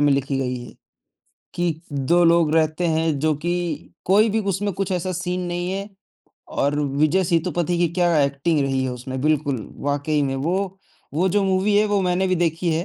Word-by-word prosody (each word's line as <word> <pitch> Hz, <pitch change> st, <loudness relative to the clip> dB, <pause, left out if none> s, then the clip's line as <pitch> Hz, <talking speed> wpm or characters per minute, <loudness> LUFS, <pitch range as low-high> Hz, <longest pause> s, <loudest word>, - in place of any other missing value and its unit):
में 145 Hz, -1 st, +4 dB
लिखी 135 Hz, 0 st, 0 dB
गई 125 Hz, -1 st, -1 dB
है, -, -, -12 dB, 0.8 s
कि 170 Hz, -2 st, -1 dB
2 145 Hz, +5 st, +2 dB
लोग 165 Hz, -2 st, +4 dB
रहते 160 Hz, +2 st, +2 dB
हैं 160 Hz, -2 st, +1 dB
जो 155 Hz, +1 st, +1 dB
कि 175 Hz, 0 st, -3 dB
कोई 210 Hz, +4 st, +4 dB
भी 220 Hz, +1 st, +1 dB
उसमें 200 Hz, 0 st, -1 dB
कुछ 195 Hz, 0 st, -2 dB
ऐसा 185 Hz, +1 st, -1 dB
सीन 180 Hz, +1 st, -2 dB
नहीं 175 Hz, +1 st, -2 dB
है 195 Hz, +1 st, -4 dB, 0.6 s
और 145 Hz, +1 st, 0 dB
विजय 150 Hz, +6 st, +1 dB
सेतुपति 175 Hz, 0 st, 0 dB
की 175 Hz, -, +3 dB
क्या 175 Hz, -3 st, +3 dB
एक्टिंग 140 Hz, +3 st, +1 dB
रही 135 Hz, -1 st, 0 dB
है 130 Hz, -, -1 dB
उसमें, 130 Hz, +1 st, -5 dB
बिल्कुल 145 Hz, -5 st, 0 dB, 0.2 s
वाक़ई 145 Hz, +1 st, 0 dB
में 135 Hz, -1 st, -1 dB
वो 185 Hz, +7 st, -2 dB, 0.4 s
वो 180 Hz, +5 st, +2 dB
जो 205 Hz, +2 st, +2 dB
मूवी 190 Hz, +2 st, +2 dB
है 210 Hz, -, +4 dB
वो 205 Hz, -1 st, +1 dB
मैंने 180 Hz, +1 st, +1 dB
भी 185 Hz, -, +2 dB
देखी 170 Hz, 0 st, 0 dB
है। 165 Hz, +2 st, -1 dB
165 Hz, 190 wpm, -22 LUFS, 145-185 Hz, 0.8 s, में